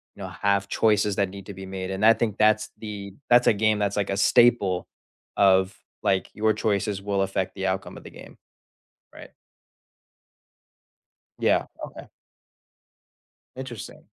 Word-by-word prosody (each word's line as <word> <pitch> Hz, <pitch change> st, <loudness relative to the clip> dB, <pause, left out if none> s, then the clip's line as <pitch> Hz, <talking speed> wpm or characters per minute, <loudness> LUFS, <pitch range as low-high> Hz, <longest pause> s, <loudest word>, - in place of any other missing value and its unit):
you -, -, -9 dB
know, -, -, -6 dB
have 100 Hz, 0 st, 0 dB
choices 105 Hz, -2 st, +1 dB
that 100 Hz, -2 st, +1 dB
need 100 Hz, 0 st, -10 dB
to 100 Hz, -, -7 dB
be 95 Hz, +1 st, -9 dB
made, 95 Hz, 0 st, -5 dB
and 95 Hz, +3 st, 0 dB
I 115 Hz, -, +8 dB
think 110 Hz, -2 st, -2 dB
that's 110 Hz, 0 st, +3 dB
the 100 Hz, -3 st, -8 dB, 0.2 s
that's 120 Hz, 0 st, +5 dB
a -, -, +6 dB
game 110 Hz, 0 st, +1 dB
that's 100 Hz, 0 st, -1 dB
like 100 Hz, -, -1 dB
a 100 Hz, -, -1 dB
staple 100 Hz, -5 st, +3 dB, 0.5 s
of 95 Hz, -1 st, +3 dB, 0.3 s
like, 95 Hz, -2 st, +1 dB
your 110 Hz, 0 st, +2 dB
choices 100 Hz, -1 st, -1 dB
will 100 Hz, -1 st, 0 dB
affect 95 Hz, -1 st, -3 dB
the 95 Hz, -, -4 dB
outcome 95 Hz, 0 st, -3 dB
of -, -, -12 dB
the -, -, -11 dB
game. -, -, -14 dB, 0.8 s
Right. -, -, -12 dB, 2.1 s
Yeah, -, -, +2 dB, 0.2 s
okay. -, -, -12 dB, 1.5 s
Interesting. 130 Hz, -5 st, -9 dB
100 Hz, 150 wpm, -25 LUFS, 95-110 Hz, 2.1 s, I